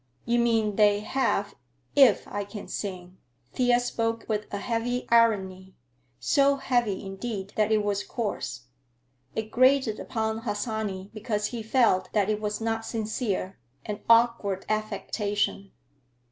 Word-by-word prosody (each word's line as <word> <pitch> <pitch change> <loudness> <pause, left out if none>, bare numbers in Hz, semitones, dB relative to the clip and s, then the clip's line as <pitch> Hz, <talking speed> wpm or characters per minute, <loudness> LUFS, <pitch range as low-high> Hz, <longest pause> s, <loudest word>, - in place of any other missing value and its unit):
"You 235 +1 +2
mean 225 -4 +1
they 205 -1 +4
have 210 -4 0 0.4
if 265 -7 +5
I 205 0 -3
can 205 +1 -9
sing." 185 -2 -6 0.3
Thea 245 -1 +3
spoke 230 -2 -2
with 210 -1 -2
a 200 - -2
heavy 235 +4 -2
irony, 190 -5 +2 0.4
so 280 -1 +3
heavy, 240 -8 0
indeed, 195 0 -5
that 215 0 +2
it 215 -1 +3
was 205 0 -1
coarse. 205 - -4 0.7
It 220 0 -3
grated 255 -3 +3
upon 220 -1 -2
Harsanyi 210 -3 -3
because 215 -1 -2
he 235 - -3
felt 220 -5 +2
that 210 -1 +2
it 210 0 -2
was 210 -1 -2
not 225 0 -1
sincere, 215 - -3 0.3
an 210 0 -4
awkward 230 -5 +3
affectation. 205 -2 -2
215 Hz, 130 wpm, -27 LUFS, 205-230 Hz, 0.7 s, if